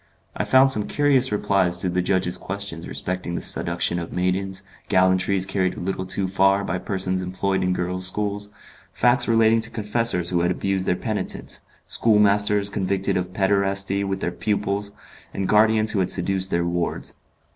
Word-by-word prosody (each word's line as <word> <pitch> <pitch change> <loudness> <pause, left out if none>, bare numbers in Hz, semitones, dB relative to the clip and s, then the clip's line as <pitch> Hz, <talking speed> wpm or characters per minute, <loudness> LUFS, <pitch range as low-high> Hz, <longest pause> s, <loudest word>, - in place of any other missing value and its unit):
I - - -2
found 130 +1 +5
some 105 -5 +2
curious 135 -4 +2
replies 95 -4 +1
to 90 - +1
the 90 0 0
judges' 90 -1 0
questions 100 -4 -6
respecting 90 -1 -4
the - - -3
seduction 85 - +1
of 85 - -6
maidens, 95 +1 -1 0.3
gallantries 95 +1 +2
carried 95 -1 -1
a - - -6
little 95 0 -3
too 95 0 +1
far 95 +1 +2
by 90 -1 -3
persons 95 -1 -1
employed 95 +1 -2
in 90 - 0
girls' 90 +1 0
schools, 105 +1 -2 0.4
facts 120 +3 +2
relating 115 0 +3
to 115 - +1
confessors 105 -5 0
who 85 -1 +1
had 90 - +1
abused 95 +1 -2
their - - +2
penitents, 110 +2 -3 0.2
schoolmasters 105 -2 +2
convicted 95 -1 -1
of 90 0 -2
pederasty 100 0 0
with 95 0 -3
their 90 - -1
pupils, 100 +1 -2 0.4
and 95 -1 -2
guardians 110 0 +3
who 100 - -1
had 95 -1 0
seduced 95 +1 0
their 85 -1 0
wards. 85 0 -3
95 Hz, 165 wpm, -23 LUFS, 90-105 Hz, 0.4 s, found